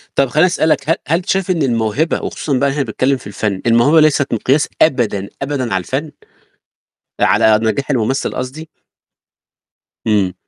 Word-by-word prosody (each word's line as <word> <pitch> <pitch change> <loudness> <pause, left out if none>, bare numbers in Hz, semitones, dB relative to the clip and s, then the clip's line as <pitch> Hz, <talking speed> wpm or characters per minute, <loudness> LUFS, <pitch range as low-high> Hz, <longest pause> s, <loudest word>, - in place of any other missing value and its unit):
طَب 140 - +3
خلّيني 155 +6 +3
أسألك 155 -4 0
ه 165 - +4
هل 165 - +2
أنت 175 - -7
شايف 190 -1 0
إن 170 -3 -1
الموهبة 120 +5 0
وخصوصًا 140 -4 -2
بقى 140 - +2
هنا 140 0 -1
باتكلم 130 +3 0
في 115 - -12
الفن، 100 -1 -3
الموهبة 120 +8 +4
ليست 145 -3 +2
مقياس 135 +6 +1
أبدًا، 110 -9 +1
أبدًا 135 -5 -2
على 95 - 0
الفن؟ 145 - -4 1.1
على 110 -1 +4
نجاح 135 +6 -1
الممثل 130 +2 -1
قصدي؟ 145 +6 -6 1.4
إمم. 100 -4 +1
135 Hz, 155 wpm, -16 LUFS, 110-155 Hz, 1.4 s, ه